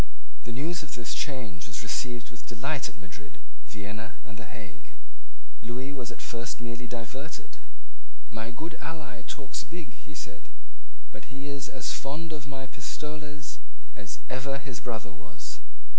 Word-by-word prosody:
The 120 - +1
news 160 +8 +4
of 140 -4 -1
this 110 -3 +3
change 110 - +2
was 100 +2 +2
received 120 +1 +3
with 120 - -7
delight 130 +5 +4
at - - -11
Madrid, 90 -2 -6 0.3
Vienna, 105 +4 -1
and 115 - -5
the 110 +1 -3
Hague. 95 - -6 0.7
Lewis 125 +4 +1
was 125 -4 +1
at - - -4
first 115 +1 +2
merely 120 +1 +1
diverted. 125 +6 -1 0.7
"My 110 +1 +2
good 160 +7 0
ally 150 -11 -1
talks 135 +6 +1
big," 160 -5 -3
he 100 - -8
said; - - -3 0.6
"but - - -5
he 135 +1 -2
is 140 -1 +2
as 130 - +3
fond 155 +4 +2
of 145 -2 -1
my 135 -1 0
pistoles 150 +3 -1 0.4
as 100 +2 -1
ever 135 +2 +4
his 135 -4 -1
brother 110 -5 +1
was." 85 0 -4
125 Hz, 155 wpm, -35 LUFS, 110-140 Hz, 0.7 s, news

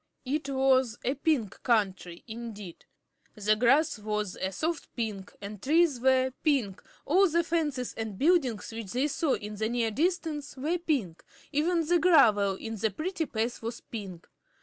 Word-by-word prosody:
It 280 +2 -2
was 265 -3 +2
a 255 - +1
Pink 285 - -1
Country, 190 -7 0
indeed. 220 -6 -8 0.5
The 210 0 +2
grass 270 +4 +3
was 210 -2 -2
a 190 - -3
soft 315 - -3
pink, 210 -5 -4
the 200 +1 -7
trees 300 - +2
were 260 0 +3
pink, 255 - 0 0.2
all 370 +6 +4
the 340 +2 +2
fences 300 -7 -1
and 220 -3 -5
buildings 275 - +2
which 225 -4 -6
they 260 +4 +1
saw 295 0 0
in 210 0 -7
the 220 +1 -1
near 235 -2 0
distance 310 - -1
were 315 +7 -1
pink 265 - -2 0.3
even 325 +3 +1
the 350 +2 +3
gravel 220 - +5
in 225 +3 -6
the 220 +2 +1
pretty 320 - -3
paths 230 +2 -2
was 230 +1 -5
pink. 195 -7 -8
250 Hz, 160 wpm, -29 LUFS, 210-305 Hz, 0.5 s, gravel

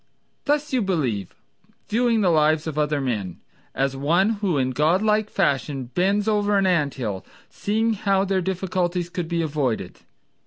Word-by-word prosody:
Thus 295 0 0
you 255 - +2
believe, 135 - -1 0.5
viewing 230 0 +2
the 185 -3 +3
lives 155 0 +3
of 160 -3 -4
other 150 -1 0
men, 105 -10 -3 0.4
As 135 0 0
one 170 +10 +2
who 185 -7 +1
in 130 -1 +1
God 155 +9 +2
like 215 0 +2
fashion 135 -2 -1
bends 200 +3 +1
over 205 -1 +2
an 195 - +2
anthill, 140 - 0 0.3
Seeing 220 +2 0
how 195 -2 +1
their 190 -1 0
difficulties 180 -1 -2
could 175 -2 -3
be 170 0 -1
avoided. 135 - -2
175 Hz, 155 wpm, -23 LUFS, 140-200 Hz, 0.5 s, the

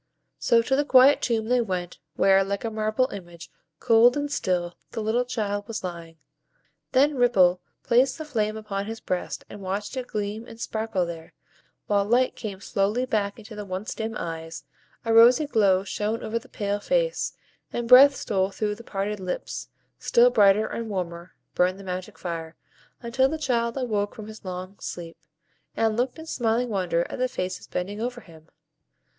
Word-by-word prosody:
So 230 -1 +3
to 265 +3 +1
the 290 - +2
quiet 270 0 +6
tomb 225 -3 0
they 245 +2 +2
went, 180 -5 -4 0.2
where, 195 0 +5
like 200 +1 -3
a 225 - -2
marble 215 +3 +1
image, 175 -4 -10 0.3
cold 240 +2 +5
and 290 0 -2
still, 180 -8 -1 0.2
the - - -5
little 220 +3 +1
child 205 -4 -3
was 225 -3 -5
lying. 170 -2 -7 0.7
Then 285 +3 +4
Ripple 190 -8 +4 0.2
placed 250 +3 +3
the 315 - -6
flame 215 -7 -1
upon 200 -2 -4
his 225 0 -5
breast, 180 -4 -4
and 205 - -10
watched 200 +5 -4
it 255 -1 -4
gleam 210 +2 -4
and 225 -1 -12
sparkle 220 -5 -1
there, 165 -1 -8 0.5
while 200 -1 +2
light 245 +5 +2
came 200 -4 -6
slowly 205 +6 0
back 205 -4 -1
into 220 0 -11
the 210 - -5
once 190 +2 -5
dim 225 0 -4
eyes, 165 -1 -6 0.4
a 225 - +1
rosy 240 +6 +7
glow 200 -8 +3
shone 210 +3 -2
over 230 +2 -2
the 265 - -19
pale 205 -1 -2
face, - - 0 0.4
and 240 -1 -3
breath 270 +3 +9
stole 190 -6 0
through 210 +1 -2
the 230 +3 -11
parted 205 0 -3
lips; 185 -1 -5 0.3
still 245 +1 +4
brighter 210 -1 +5
and 230 0 -5
warmer 175 -3 -5 0.2
burned 185 +2 +1
the - - -10
magic 185 -1 -6
fire, 165 -2 -5 0.5
until 260 +3 +2
the 315 - -2
child 235 -4 0
awoke 210 -6 -1
from 215 - -8
his 220 0 -11
long 185 +1 -7
sleep, 165 -1 -7 0.6
and 225 -1 +2
looked 245 +4 -1
in 320 - -9
smiling 240 -4 0
wonder 180 -4 0
at - - -7
the 255 - +2
faces 185 -7 -5
bending 200 +4 -4
over 245 +1 -3
him. 160 -4 -17
215 Hz, 180 wpm, -25 LUFS, 190-240 Hz, 0.7 s, breath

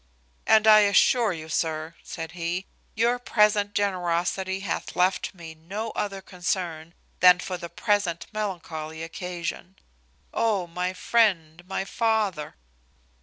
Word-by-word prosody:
"And 220 -1 +5
I 215 -1 +9
assure 210 +2 +4
you, 160 -3 -6
sir," 160 0 -2
said 165 -2 -7
he, 175 +2 -3 0.3
"your 235 +2 +2
present 210 -3 +2
generosity 190 0 0
hath 200 - -4
left 185 +2 +1
me 165 -2 -9
no 195 +8 -5
other 195 -2 -3
concern 175 -3 -3 0.2
than 180 -1 +8
for 185 0 -4
the 170 -1 -7
present 200 -6 0
melancholy 160 -6 -4
occasion. 175 +2 -5 0.6
Oh, 215 -5 +1
my 180 +2 -3
friend, 180 -6 +1
my 190 0 -2
father!" 210 -9 0
185 Hz, 125 wpm, -26 LUFS, 170-205 Hz, 0.6 s, I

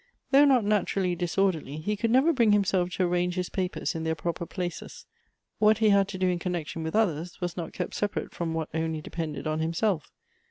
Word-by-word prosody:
Though 280 +1 +7
not 255 -6 +4
naturally 195 -3 +1
disorderly, 175 -4 0
he 205 +7 -2
could 225 +3 -1
never 265 +8 +4
bring 230 -6 +4
himself 190 -3 +2
to 185 - 0
arrange 180 0 0
his 180 -1 -2
papers 185 0 -2
in 165 -2 -4
their 160 0 0
proper 170 +2 -3
places. 180 -3 -6 0.5
What 215 0 +5
he 220 -1 +3
had 200 -1 +4
to 200 -2 -6
do 185 0 +1
in 180 -1 0
connection 170 -3 -3
with 160 +3 -3
others, 175 -6 0
was 175 -1 -3
not 170 -3 -5
kept - - -4
separate 205 -1 -2
from 165 -2 -3
what 160 -1 -2
only 160 -1 -2
depended 160 -1 -5
on 155 0 -1
him 160 +1 -1
self. 170 -4 0
180 Hz, 210 wpm, -27 LUFS, 165-205 Hz, 0.5 s, Though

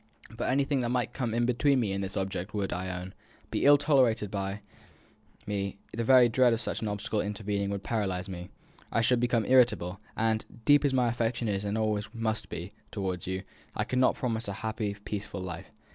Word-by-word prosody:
But - - -2
anything 140 +1 +2
that 120 -2 -1
might 125 0 0
come 125 -4 -2
in 120 +1 +1
between 130 +3 +3
me 110 -5 0
and 100 0 -2
this 95 +1 -4
object 95 +2 -3
would, 100 -2 -1
I 90 +1 -3
own, 90 +1 -5 0.4
be - - 0
ill 145 +1 +8
tolerated 130 -8 +3
by 100 0 -3 0.8
me; 100 -1 -2 0.2
the 115 - -1
very 125 0 +7
dread 120 +1 +4
of 115 - 0
such 115 - -3
an 110 - -1
obstacle 105 +1 -1
intervening 100 -1 -2
would 100 -1 -3
paralyse 95 -5 -1
me. 90 -2 -7 0.4
I 115 - +2
should 120 +1 +3
become 120 -2 +1
irritable, 120 -8 +3 0.2
and, 110 0 +1 0.2
deep 145 0 +6
as 140 - +3
my 125 -2 +3
affection 115 0 -1
is, 100 -1 -1
and 105 +1 -1
always 110 -1 0
must 110 -1 -2
be, - - -6 0.2
towards 95 -3 -3
you, 95 +1 -2 0.3
I - - 0
could 125 - -1
not 130 - +4
promise 115 -3 -2
you 100 - -3
a - - -8
happy, 110 -1 -3
peaceful 100 -1 -4
life. 90 0 -6
110 Hz, 205 wpm, -29 LUFS, 100-120 Hz, 0.8 s, ill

